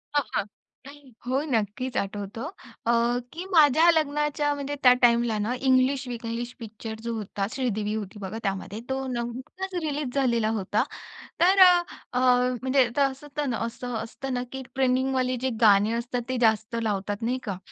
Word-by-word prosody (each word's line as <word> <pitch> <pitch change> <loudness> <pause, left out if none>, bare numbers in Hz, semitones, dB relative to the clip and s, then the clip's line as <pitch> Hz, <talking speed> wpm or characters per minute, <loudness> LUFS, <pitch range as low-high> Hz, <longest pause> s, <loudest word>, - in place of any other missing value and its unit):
हां, 290 - +4
हां. - - +2 0.4
नाही, 280 -2 -13
हो, 260 +3 0
नक्कीच 225 +4 -1
आठवतो, 205 +2 -4 0.4
अ, 235 - +3 0.4
की 345 +3 -6
माझ्या 315 0 +6
लग्नाच्या 295 -1 +1
म्हणजे 285 0 -4
त्या 250 -1 +8
टाईमला 235 -2 +4
ना, 215 +4 -1
"इंग्लिश 260 0 +2
विंग्लिश" 235 0 -4
पिक्चर 220 -1 -7
जो 235 0 -2
होता, 205 -2 -3
श्रीदेवी 215 -5 -1
होती 210 -1 -6
बघा 200 +2 -5
त्यामध्ये, 195 +2 -3
तो 265 0 -2
नुकताच 255 +10 -5
रिलीज 295 -4 -2
झालेला 235 -5 +2
होता. 205 +2 0 0.6
तर 380 +3 +5
अ, 360 - +8 0.4
अ, 250 - +1 0.4
म्हणजे 260 -1 +3
त - - +3
असं 270 +2 -9
त 295 - 0
ना 235 - -1
असं 245 +1 -5
असतं 265 +3 -6
ना 245 0 -1
की 265 0 -5
ट्रैनिंग 260 0 +1 0.2
जे 260 - +1
गाणी 205 0 +5
असतात, 240 +1 -2
ते 255 - -1
जास्त 220 0 +2
लावतात, 205 -1 -2
नाही 245 +3 0
का? 200 -5 -4
245 Hz, 165 wpm, -26 LUFS, 220-270 Hz, 0.6 s, त्या